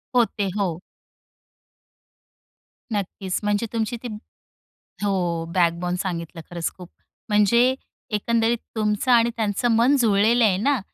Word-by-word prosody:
होते, 220 -4 +2
हो. 180 -5 -1 2.1
नक्कीच, 195 -2 -3
म्हणजे 205 +2 +1
तुमची 230 +1 -1
ती - - -3 1.0
हो. 175 -5 0
बॅकबोन 175 0 +1
सांगितलं. 170 -3 -4
खरंच 170 -2 -2
खूप 180 -2 -11 0.4
म्हणजे 235 +5 +4 0.4
एकंदरीत 230 +2 +1 0.2
तुमचं 210 +3 0
आणि 235 0 +5
त्यांचं 220 +1 0
मन 250 +5 +4
जुळलेलं 225 +2 +4
आहे 195 -4 +4
ना. 270 +5 +1
210 Hz, 110 wpm, -23 LUFS, 185-230 Hz, 2.1 s, आणि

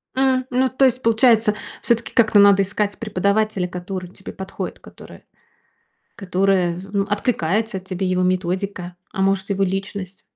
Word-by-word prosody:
У, - - -1 0.3
ну 255 +1 +1
то 265 +1 +2
есть, 255 0 +1
получается, 225 -2 +3 0.3
всё-таки 235 -1 0
как-то 220 -3 +4
надо 200 -1 +6
искать 205 +1 -2
преподавателя, 200 -1 0
который 180 0 -6
тебе 190 - -11
подходит, 190 0 -6
который - - -14 0.9
которая, 185 -3 +1 0.2
ну, 200 -1 +1
в - - -16
откликается 205 0 0
тебе, 185 0 -4
его 185 0 +1
методика, 185 0 -2 0.2
а 195 - -3
может, 195 0 +1
его 195 0 +1
личность. 195 0 -4
195 Hz, 145 wpm, -21 LUFS, 185-215 Hz, 0.9 s, надо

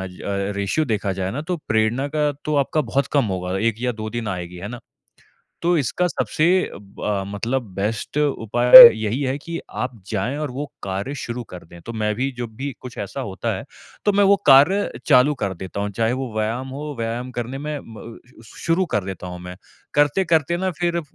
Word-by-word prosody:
अ, 95 - -4 0.5
ratio 100 +10 0
देखा 105 -6 -1
जाए 95 0 -3
ना 145 - -4
तो 180 - 0
प्रेरणा 110 +5 +1
का 150 -1 +2
तो 150 -1 0
आपका 140 +2 +1
बहुत 140 +1 0
कम 140 -3 +3
होगा, 90 +1 -3
1 115 +2 +1
या 125 0 0
2 110 -1 -6
दिन 120 -2 -4
आएगी, 90 -1 -5
है 95 +4 -6
ना? 120 +1 -8 0.8
तो 175 0 +2
इसका 145 +6 0
सबसे 160 -2 0 0.3
ब 100 0 -13
अ, 100 -2 0
मतलब 120 +6 -1
बेस्ट 105 +7 -3
उपाय 120 -4 0 0.2
यही 110 +4 -2
है 135 0 -1
कि 165 +3 -6 0.2
आप 125 - -3 0.2
जाएँ 115 +9 -1
और 150 -3 -3
वो 140 +4 -4 0.2
कार्य 100 +9 -3
शुरू 120 +1 -5
कर 90 - -9
दें। 85 +1 -14
तो 115 - -6
मैं 105 -1 -1
भी 135 +4 -1
जब 115 -3 -6
भी 140 +2 -3
कुछ 125 -2 -10
ऐसा 100 +7 -5
होता 95 -7 -3
है, - - -7 0.4
तो 205 - +4
मैं 205 0 +4
वो 200 +1 +6
कार्य 145 +9 +6 0.2
चालू 140 0 +5
कर 100 - -1
देता 95 +3 -7
हूँ। 105 - -2
चाहे 115 +3 0
वो 130 -3 -4
व्यायाम 115 +5 -2
हो, 145 +2 -6
व्यायाम 120 +3 -3
करने 120 +3 -4
में 150 +1 -4
म 115 +1 -11 0.3
शु 110 - -16
शुरू 170 +3 +2
कर 105 - +1
देता 95 -2 -6
हूँ 90 0 -7
मैं। 90 0 -9 0.4
करते-करते 160 +2 +2
ना 185 +1 -1
फ़िर 170 -1 0
अ, - - -1
125 Hz, 210 wpm, -22 LUFS, 105-145 Hz, 0.8 s, वो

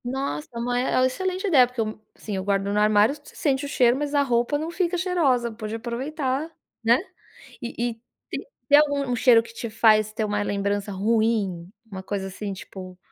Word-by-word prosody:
Nossa, 245 - -3
mas 245 +1 0
é - - 0
oh, - - +4
uma - - +5
excelente 370 +8 -2
ideia, 265 -9 +6
porque 250 0 -10
eu, 215 -1 -2
sim, 210 - -6
eu 190 - -2
guardo 195 0 +1
no 205 - +1
armário, 210 +3 +4
você 290 0 -15
sente 280 -1 0
o - - -5
cheiro, 245 -3 +4
mas 290 +1 -2
a 285 - +4
roupa 245 +2 +1
não 315 +3 -4
fica 360 0 0
cheirosa, 300 -10 +1
pode 220 0 -6
aproveitar, 265 +5 -3 0.3
né, 230 +2 +5 0.6
e 240 - -6 0.2
e - - -5 0.4
te - - -7 0.2
tem 290 - +8
algum 285 -2 +2
um - - +1
cheiro 235 -1 +6
que 230 - -13
te 230 -1 -6
faz 215 -1 +4
ter 220 - -2
uma 205 -1 -1
lembrança 200 0 -1
ruim? 205 -3 0 0.2
Uma 190 -1 -6
coisa, 195 0 -3
assim, 195 +1 -5
tipo, 185 -1 -10
235 Hz, 205 wpm, -24 LUFS, 210-280 Hz, 0.6 s, tem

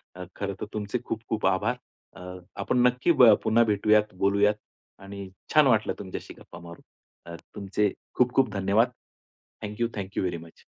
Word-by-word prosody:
अ, 90 - -7
खरं 100 -1 -3
तर - - -2
तुमचे 105 +3 -3
खूप-खूप 110 -1 -3
आभार. 105 +7 +1 0.4
अ, 95 - -12 0.4
आपण - - 0
नक्की 125 +7 +1
ब 115 - +9
पुन्हा 115 +2 +4
भेटूयात, 105 0 +2
बोलूयात 100 +2 +2 0.5
आणि 100 -1 -8 0.2
छान 155 -3 +6
वाटलं 110 -4 +2
तुमच्याशी 95 -2 -7
गप्पा - - -13
मारून 85 0 -12 0.4
अ, 85 0 -8 0.2
तुमचे 100 0 -1 0.2
खूप-खूप 125 -1 +2
धन्यवाद. 100 +4 +2 0.8
Thank 105 +1 -7
you. 115 - +3
Thank 100 0 -6
you - - +1
very 90 -2 -2
much. 80 - -19
105 Hz, 160 wpm, -26 LUFS, 100-115 Hz, 0.8 s, ब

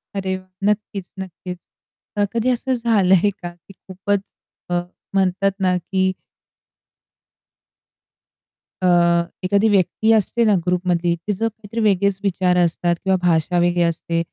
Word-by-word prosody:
अरे 190 -1 -1
वाह! 185 - -15 0.2
नक्कीच, 205 -2 -2
नक्कीच. 180 -1 -7 0.8
कधी 235 +2 +1
असं 255 +1 0
झालंय 205 -5 +3
का 175 0 -6
की 175 +3 -18
खूपच 195 +2 -3 0.5
अ, 175 0 +1 0.3
म्हणतात 195 0 +2
ना 185 -1 +2
की 190 +1 0 2.7
अ, 185 - +2 0.6
एखादी 200 +4 +2
व्यक्ती 205 +3 +2
असते 220 +2 +2
ना 210 -2 +4
ग्रुपमधली 175 -1 +1
ती 190 +5 -4
जर 225 +4 -1
काहीतरी 220 0 -7
वेगळेच 200 -1 +2
विचार 185 -2 +1
असतात 170 +1 0
किंवा 190 -1 +2
भाषा 175 0 +1
वेगळी 175 0 +2
असते. 170 0 -1
190 Hz, 125 wpm, -20 LUFS, 180-205 Hz, 2.7 s, ना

